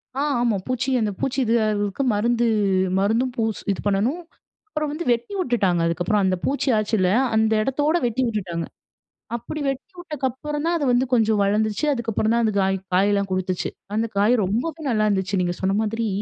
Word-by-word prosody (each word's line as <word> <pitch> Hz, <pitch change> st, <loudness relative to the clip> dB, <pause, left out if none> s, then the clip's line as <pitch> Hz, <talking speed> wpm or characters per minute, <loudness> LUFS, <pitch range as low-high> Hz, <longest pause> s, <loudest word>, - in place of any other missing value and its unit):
ஆ. 275 Hz, -, -1 dB, 0.2 s
ஆமா 235 Hz, -4 st, +2 dB
பூச்சி 255 Hz, +1 st, -1 dB
அந்த 215 Hz, -1 st, 0 dB
பூச்சி 270 Hz, +1 st, -1 dB
இதாகுறதுக்கு 215 Hz, 0 st, +1 dB
மருந்து 235 Hz, +3 st, +1 dB, 0.5 s
மருந்தும் 230 Hz, +6 st, +1 dB
பூஸ் 220 Hz, -2 st, -1 dB
இது 195 Hz, -, -3 dB
பண்ணணும். 225 Hz, -, +1 dB, 0.5 s
அப்பறம் 305 Hz, -7 st, -3 dB
வந்து 310 Hz, +4 st, -4 dB
வெட்டி 235 Hz, -, -1 dB
விட்டுட்டாங்க 205 Hz, -, +1 dB
அதுக்கப்றம். 175 Hz, +5 st, +1 dB
அந்த 185 Hz, 0 st, +2 dB
பூச்சி 280 Hz, 0 st, 0 dB
ஆச்சில, 210 Hz, -3 st, +1 dB, 0.3 s
அந்த 220 Hz, 0 st, +3 dB
எடத்தோடு 290 Hz, +7 st, +1 dB
வெட்டி 240 Hz, +2 st, 0 dB
விட்டுட்டாங்க. 180 Hz, -7 st, -3 dB, 0.7 s
அப்டி 240 Hz, +6 st, -5 dB
வெட்டி 275 Hz, +8 st, -4 dB
விட்டக்கப்பறந்தான் 300 Hz, +1 st, -2 dB
அது 295 Hz, -, -1 dB
வந்து 245 Hz, +2 st, +3 dB
கொஞ்சம் 220 Hz, -3 st, +3 dB
வளந்துச்சு, 210 Hz, +6 st, +1 dB
அதுக்கப்பறந்தான் 230 Hz, -1 st, 0 dB
அந்த 215 Hz, -, +1 dB
காய் 195 Hz, 0 st, +1 dB, 0.2 s
காயலாம் 200 Hz, +1 st, +2 dB
கொடுத்துச்சு. 185 Hz, -1 st, -1 dB, 0.3 s
அந்த 225 Hz, +1 st, +1 dB
காய் 210 Hz, +5 st, +4 dB
ரொம்பவே 275 Hz, -, -2 dB
நல்லாயிருந்துச்சு 205 Hz, -4 st, +1 dB
நீங்க 175 Hz, 0 st, -1 dB
சொன்ன 195 Hz, +1 st, +1 dB
மாதிரி, 225 Hz, +1 st, -1 dB
225 Hz, 155 wpm, -23 LUFS, 200-260 Hz, 0.7 s, காய்